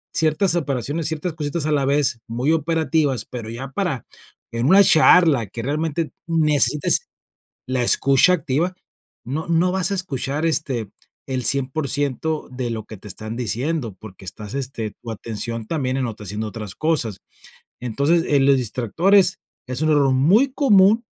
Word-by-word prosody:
ciertas 160 +3 +2
operaciones, 145 0 -2
ciertas 160 +2 -3
cositas 150 0 -3
a - - 0
la 140 -2 +1
vez, 140 -3 +1
muy 125 +6 -1
operativas, 160 -5 0
pero 115 -3 -7
ya 130 +4 -6
para, 150 - -2 0.5
en 115 +1 -2
una 195 +5 +7
charla 155 - +5
que 115 +4 -7
realmente 155 +3 -2 0.2
necesites 150 -4 +2 0.6
la 130 -1 0
escucha 140 +8 +4
activa, 170 +2 -1 0.5
no 150 +8 -4
no 170 +2 +2
vas 190 0 0
a - - 0
escuchar, 150 -4 -2
este, 135 -9 -1 0.4
el 130 -2 -2
100% 140 +3 0
de 125 -1 -4
lo 110 -1 -4
que 110 - -10
te 100 - -13
están 110 +3 -6
diciendo, 125 - -2
porque 95 -3 -12
estás, 105 +6 -8
este 125 -6 -4
tu 115 - -7
atención 115 +1 -5
también 130 -4 -2
en 130 -2 -1
otra 110 -2 -8
haciendo 105 +2 -4
otras 105 -2 -7
cosas. 150 - 0 0.6
Entonces, 140 +8 +1
eh, 145 - +3
los 135 0 +4
distractores 170 - +2 0.3
es 130 +3 -4
un 155 - +1
error 140 -3 +3
muy 190 - +3
común 220 -5 +4
140 Hz, 155 wpm, -21 LUFS, 120-160 Hz, 0.6 s, una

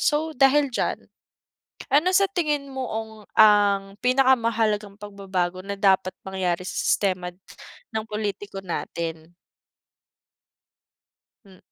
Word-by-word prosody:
So 310 +2 +1
dahil 275 +2 +4
diyan, 245 - -2 0.9
ano 305 +5 +4
sa 395 +1 +5
tingin 300 -7 -1
mo 265 -1 -3
ong 220 0 -4 0.3
ang 205 -2 +5
pinakamahalagang 230 -5 +2
pagbabago 190 -3 -3
na 200 0 -4
dapat 190 -2 +3 0.2
mangyari 185 -2 -1
sa - - -5
si - - -2
sistema 185 -3 0
n 175 - -30 0.6
ng 220 - -1
pulitiko 205 -2 -4
natin? 165 -1 -5 2.1
Hmm. 190 -2 -18
205 Hz, 115 wpm, -24 LUFS, 190-255 Hz, 2.1 s, sa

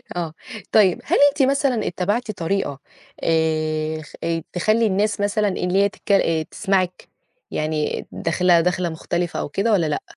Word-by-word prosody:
آه، 165 -3 -3 0.4
طيب، 195 -5 +4
هل - - +1
أنتِ 280 -1 0
مثلًا 275 -4 +1
اتّبعتِ 205 +6 -1
طريقة 175 -5 -2 0.4
آآ، 155 -1 0
خ 150 - -14
آآ، 165 -1 -1
تخلّي 215 +5 +2
الناس 205 +2 0
مثلًا 205 +1 +1
اللي 185 0 0
هي 200 - +3
تتكل 200 - -3
آآ، 160 -1 0
تسمعِك؟ 185 -1 -1 0.4
يعني 155 -1 -2
داخلة 170 +1 +2
دخلة 180 0 0
مختلفة 170 +1 -3
أو - - -3
كده 195 +10 0
والّا 185 -6 +3
لأ؟ 150 -1 -1
180 Hz, 155 wpm, -22 LUFS, 160-205 Hz, 0.4 s, طيب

